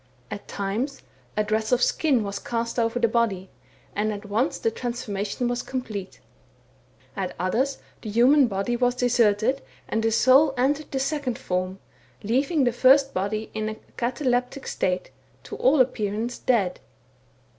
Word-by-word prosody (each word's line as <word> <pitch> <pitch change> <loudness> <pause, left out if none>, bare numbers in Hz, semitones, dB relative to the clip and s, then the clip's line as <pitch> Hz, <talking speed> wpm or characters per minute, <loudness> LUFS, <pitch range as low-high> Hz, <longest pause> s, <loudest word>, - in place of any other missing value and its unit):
At - - -7
times, 215 +8 -3 0.3
a 210 - +3
dress 215 +2 -1
of 250 0 +3
skin 275 -8 +2
was 200 0 -4
cast 230 0 -2
over 230 +1 +1
the 240 -1 +3
body, 215 -5 0 0.4
and 215 +1 0
at 205 0 -6
once 220 +8 0
the 225 - 0
transformation 235 -2 -3
was 245 0 -1
complete; 215 -7 -5 1.0
at 190 -2 -3
others, 250 +9 0 0.2
the 220 - -6
human 250 +5 +5
body 200 +3 -1
was 245 0 +1
deserted, 245 0 +2 0.3
and 225 - 0
the 225 0 +1
soul 265 +5 +5
entered 285 +4 +1
the 270 - -1
second 275 -3 -1
form, 185 +1 -2 0.5
leaving 275 - +1
the 245 -2 +2
first 270 +3 +5
body 215 +3 -2
in 215 0 -2
a 215 - -5 0.2
cataleptic 250 +1 -1
state, 180 0 -1 0.3
to - - -7
all 275 +3 +4
appearance 230 -1 0
dead. 200 -8 +1
235 Hz, 150 wpm, -25 LUFS, 210-255 Hz, 1.0 s, human